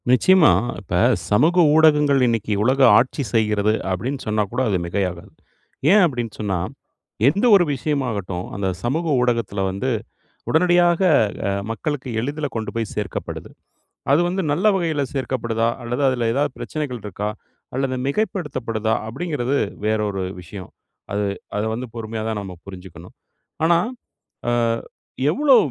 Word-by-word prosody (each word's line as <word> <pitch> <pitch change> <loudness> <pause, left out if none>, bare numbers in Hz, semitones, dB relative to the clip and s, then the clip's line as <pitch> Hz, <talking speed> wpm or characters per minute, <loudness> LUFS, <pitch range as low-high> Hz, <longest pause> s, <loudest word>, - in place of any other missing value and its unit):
நிச்சயமா, 160 - +6 0.3
இப்ப 90 -4 -2 0.3
சமூக 150 +12 +3 0.2
ஊடகங்கள் 150 -3 +5
இன்னைக்கு 115 -2 0
உலக 130 +4 +2 0.2
ஆட்சி 130 +3 +1
செய்கிறது 105 -1 +2 0.2
அப்படின்னு 120 +10 -2
சொன்னா 105 0 +1
கூட, 125 +2 -1
அது 100 - +1
மிகையாகாது. 90 -1 -3 0.6
ஏன் 210 +1 +7
அப்படின்னு 120 -8 -3
சொன்னா, 100 -3 -1 0.7
எந்த 195 - +2
ஒரு 190 - +6
விஷயமாகட்டும் 120 - -2
அந்த 100 -1 -2 0.2
சமூக 155 +8 -1 0.2
ஊடகத்துல 115 -5 0
வந்து 100 +8 -2 0.6
உடனடியாக 175 +1 +4 0.7
மக்களுக்கு 135 +3 -4
எளிதில் 145 +4 -3
கொண்டு 110 -1 -3
போய் 115 -3 -2
சேர்க்கப்படுது. - - -5 0.6
அது 145 - +5
வந்து 190 +2 -1
நல்ல 180 +8 0
வகையில 160 -6 0
சேர்க்கப்படுதா, 120 -4 -1
அல்லது 120 +4 -2
அதில 120 -3 0
ஏதாவது 140 +2 0
பிரச்சனைகள் 145 -6 -4
இருக்கா, 105 +1 -4 0.5
அல்லது 135 0 -1
மிகைப்படுத்தப்படுதா 130 - -1
அப்படிங்கிறது 140 0 -2 0.3
வேற 110 0 +2
ஒரு 95 -1 -3 0.2
விஷயம். 90 +1 -10 0.4
அது 100 0 0 0.3
அதை 105 +1 -1
வந்து 125 +3 -4
பொறுமையா 110 -1 -5
தான் 110 -2 -2
நம்ம 95 -2 -8
புரிஞ்சிக்கணும். 90 -3 -11 0.5
ஆனா, 170 +1 +4 0.7
ஆ - - +3 0.8
எவ்வளோ 275 - +5
120 Hz, 130 wpm, -21 LUFS, 105-150 Hz, 0.8 s, ஏன்